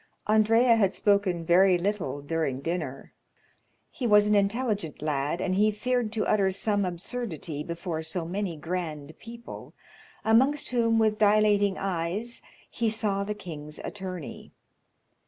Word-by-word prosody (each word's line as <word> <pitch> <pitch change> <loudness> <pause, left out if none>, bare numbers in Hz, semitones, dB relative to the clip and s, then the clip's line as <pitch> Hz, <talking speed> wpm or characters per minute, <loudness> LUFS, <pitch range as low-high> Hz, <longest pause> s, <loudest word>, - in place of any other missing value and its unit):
Andrea 225 +2 +4
had 195 -3 +2
spoken 200 -5 +1
very 180 +2 +5
little 175 -7 -2
during 145 -3 -2
dinner; 150 -4 -4 0.8
he 250 - -3
was 210 -1 +6
an 210 - +2
intelligent 205 - 0
lad, 150 +1 -1
and 185 0 -1
he 210 +3 +3
feared 230 +2 -1
to 220 - -1
utter 200 -2 +2
some 200 +1 0
absurdity 175 -4 -4
before 170 0 -4
so 160 +2 -2
many 180 -1 -3
grand 160 -2 -5
people, 235 +1 -10 0.5
amongst 265 +7 +3
whom, 230 -2 +2
with 215 -1 +2
dilating 205 -2 +3
eyes, 195 +5 -2 0.3
he 230 -1 -1
saw 210 -3 0
the 210 +1 -4
king's 155 -6 -8
attorney. 185 -5 -7
200 Hz, 135 wpm, -27 LUFS, 170-215 Hz, 0.8 s, was